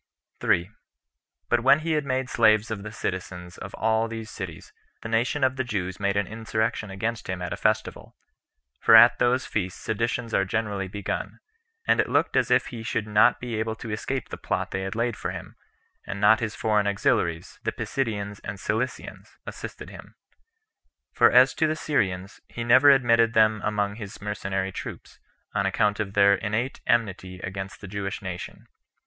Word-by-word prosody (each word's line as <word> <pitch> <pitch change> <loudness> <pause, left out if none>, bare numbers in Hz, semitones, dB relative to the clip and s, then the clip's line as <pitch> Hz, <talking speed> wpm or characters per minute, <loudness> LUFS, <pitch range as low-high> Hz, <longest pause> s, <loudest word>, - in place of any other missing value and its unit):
3. 85 +1 +2 0.8
But 120 - +2
when 135 +5 +5
he 165 +1 -2
had 150 -2 +1
made 130 -1 -1
slaves 110 -2 +3
of 105 -2 -3
the 105 +1 -7
citizens 90 -3 -5
of - - -8
all 110 +1 +1
these 115 0 -7
cities, 95 -6 -8 0.3
the 115 - -5
nation 120 +5 0
of 130 0 +2
the 130 - 0
Jews 95 -6 -3
made 100 0 0
an 100 - +1
insurrection 110 0 -2
against 110 +4 -3
him 95 -1 -2
at 90 -1 -4
a - - -2
festival; 110 0 -1 0.6
for 115 - +6
at 120 +2 +8
those 125 +1 +2
feasts 95 -4 -3
seditions 115 +1 -2
are 95 - +3
generally 100 -1 -2
begun; 100 +2 -4 0.5
and - - +3
it - - +2
looked - - +1
as - - +2
if - - +3
he 115 -2 -7
should 115 -1 -2
not 110 +3 +4
be 120 -3 -4
able 110 0 -2
to 110 0 -7
escape 130 +5 -3
the - - -6
plot - - -2
they 95 - -2
had 95 +2 -4
laid 115 0 0
for - - -4
him, - - -8 0.5
had 100 - -4
not 105 +2 +5
his 110 -2 -3
foreign 105 -2 +1
auxiliaries, 85 -4 0
the - - -1
Pisidians 105 -6 -3
and 100 +1 -6
Cilicians, 120 +5 -4
assisted - - -8
him; - - -13 1.0
for - - +6
as - - +6
to 160 - +1
the 155 - 0
Syrians, 95 -11 -1
he 120 - -6
never 130 +4 +6
admitted 115 -4 +4
them 110 -1 +4
among 105 0 -1
his 100 -3 -8
mercenary 95 -2 -3
troops, - - -8 0.3
on 100 -1 +1
account 105 +1 +1
of 100 -2 -3
their 100 0 +6
innate 105 +6 -2
enmity 95 -5 0
against 95 +1 -6
the 100 - -8
Jewish 100 +1 -4
nation. 90 -1 -7
110 Hz, 180 wpm, -25 LUFS, 100-115 Hz, 1.0 s, at